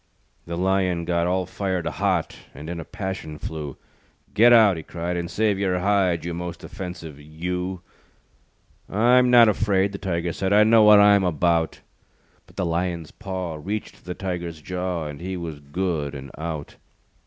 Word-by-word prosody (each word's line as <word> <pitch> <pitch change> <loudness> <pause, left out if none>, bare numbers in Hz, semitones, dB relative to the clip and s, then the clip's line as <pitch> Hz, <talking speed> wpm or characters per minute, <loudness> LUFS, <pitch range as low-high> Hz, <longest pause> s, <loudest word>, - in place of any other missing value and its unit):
The 85 0 -4
Lion 90 -2 +1
got 85 0 +1
All 90 +1 0
fired 95 -3 -3
hot 95 -3 -1 0.2
And 80 +3 -7
in 85 - -5
a - - -5
passion 95 -6 -6
flew. 75 -3 -6 0.6
"Get 115 +4 +6
out," 110 -5 +7
he 80 - -5
cried, 85 +3 -4
"And 85 -1 -3
save 105 -1 +1
your 95 -2 +1
hide, 90 -3 +1
You 85 - -3
most 85 0 -6
offensive 90 -7 -8
You." 90 +4 -4 1.1
"I'm 125 +4 +4
not 120 -2 +8
afraid," 100 -2 +2
The 100 - -7
Tiger 85 -2 -2
said, 95 +3 -1
"I 105 +1 +7
know 110 +1 +6
what 105 -1 +8
I'm 100 -1 +6
about." 85 -1 +1 0.7
But - - -20
the 95 - -1
Lion's 85 -1 -2
paw 95 -5 -5
Reached 105 +2 -5
the 90 -1 -5
Tiger's 85 -4 -4
jaw, 90 0 -3
And 75 +1 -7
he 95 +1 -4
was 80 -4 -6
good 75 -1 -3
and 70 0 -8
out. 80 -2 -6
90 Hz, 165 wpm, -24 LUFS, 85-100 Hz, 1.1 s, not